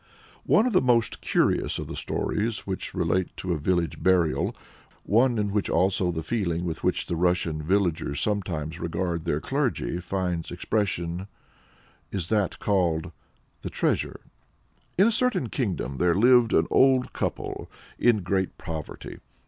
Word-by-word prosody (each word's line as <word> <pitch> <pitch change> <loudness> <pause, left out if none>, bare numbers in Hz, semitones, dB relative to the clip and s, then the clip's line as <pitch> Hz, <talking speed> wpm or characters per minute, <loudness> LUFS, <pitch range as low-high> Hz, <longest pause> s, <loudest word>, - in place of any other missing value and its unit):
" - - -26
One 220 - +5
of 250 - 0
the 185 - +5
most 120 -3 +2
curious - - +1
of - - -4
the - - -7
stories 110 0 -2
which 95 -1 -4
relate 90 +2 0
to 90 -2 -2
a 80 - -2
village 85 +2 0
burial, 90 -4 +2 0.5
one 120 +3 +3
in 105 -1 0
which 105 -1 0
also 90 0 +2
the 80 -1 -4
feeling 85 -3 -1
with 80 -2 -4
which - - +1
the 85 - -2
Russian 85 -2 +1
villagers 85 -4 0
sometimes 85 -6 -2
regard 85 0 -2
their 75 - 0
clergy 130 - -1
finds 90 -2 -2
expression 90 -1 -2 0.8
is 90 -4 -3
that 105 -4 +1
called 90 -4 0 0.5
THE - - -5
TREASURE. - - -1 0.8
In 190 - +6
a 230 - +4
certain 240 - +1
kingdom 90 - -2
there 85 +1 +3
lived 120 +2 +5
an 80 - +4
old 130 -1 +4
couple - - -3 0.3
in 110 -5 +3
great 95 +1 -1
poverty. 80 -4 -7
95 Hz, 150 wpm, -26 LUFS, 85-110 Hz, 0.8 s, In